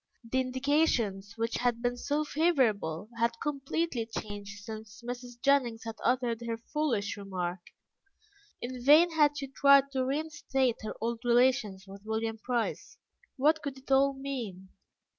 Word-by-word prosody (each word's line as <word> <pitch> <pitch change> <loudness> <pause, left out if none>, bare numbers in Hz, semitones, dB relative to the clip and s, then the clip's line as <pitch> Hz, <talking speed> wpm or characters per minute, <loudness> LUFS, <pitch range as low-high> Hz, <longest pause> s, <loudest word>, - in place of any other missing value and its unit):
The 230 +3 -1
indications, 255 -6 0
which 230 +1 -1
had 240 -1 0
been 245 0 +1
so 290 +5 -1
favourable, 230 - +1
had 230 0 +1
completely 280 -3 -2
changed 205 -2 -7
since 220 +1 -9
Mrs. 245 0 -7
Jennings 245 -4 +2
had 225 -1 -6
uttered 245 -2 +1
her 230 -1 -3
foolish 235 -4 -1
remark; 185 -2 -3 1.0
in 250 0 -6
vain 310 +6 +7
had 295 -2 +3
she 285 - -3
tried 275 0 +5
to 260 -1 0
reinstate 270 -3 0
her 215 - -5
old 230 +1 -2
relations 240 -5 +2
with 195 0 -11
William 220 +1 -2
Price. 240 0 -2 0.4
What 310 +4 +3
could 280 -2 -5
it 265 +1 -11
all 275 +1 +5
mean? 240 -9 -6
245 Hz, 140 wpm, -30 LUFS, 220-275 Hz, 1.0 s, vain